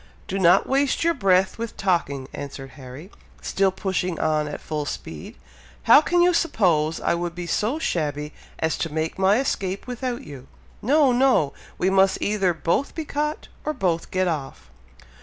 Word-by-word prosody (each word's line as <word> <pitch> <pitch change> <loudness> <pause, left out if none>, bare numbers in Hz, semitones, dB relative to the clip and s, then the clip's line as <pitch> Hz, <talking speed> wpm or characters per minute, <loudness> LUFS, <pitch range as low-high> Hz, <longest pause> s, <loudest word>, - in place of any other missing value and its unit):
"Do 195 - -2
not 180 +1 +5
waste 275 +3 +1
your 335 0 +3
breath 190 - +2
with 230 -1 -5
talking," 155 -8 0
answered 135 -1 -7
Harry, 135 +8 -11 0.3
still 195 0 +1
pushing 185 -2 -2
on 155 -1 +1
at 150 - -5
full 150 -2 -4
speed. - - -7 0.5
"How - - +8
can 350 +2 +2
you 355 0 +4
suppose 170 - +1
I - - +1
would 170 0 -3
be 175 0 -5
so 215 - 0
shabby 150 - -2 0.2
as 160 0 -1
to 165 - -2
make 160 +3 -3
my 195 +2 +4
escape 195 -7 -2
without 250 0 -4
you! 135 -3 -11 0.3
No! 280 +3 +4
no! 245 - +3 0.2
we 185 +2 +1
must 190 0 +4
either 200 -3 +1
both 170 - -1
be 320 - -4
caught, 300 +2 -3 0.2
or 305 - -2
both 175 - -1
get 185 0 0
off!" 135 - -5
185 Hz, 170 wpm, -23 LUFS, 155-245 Hz, 0.5 s, How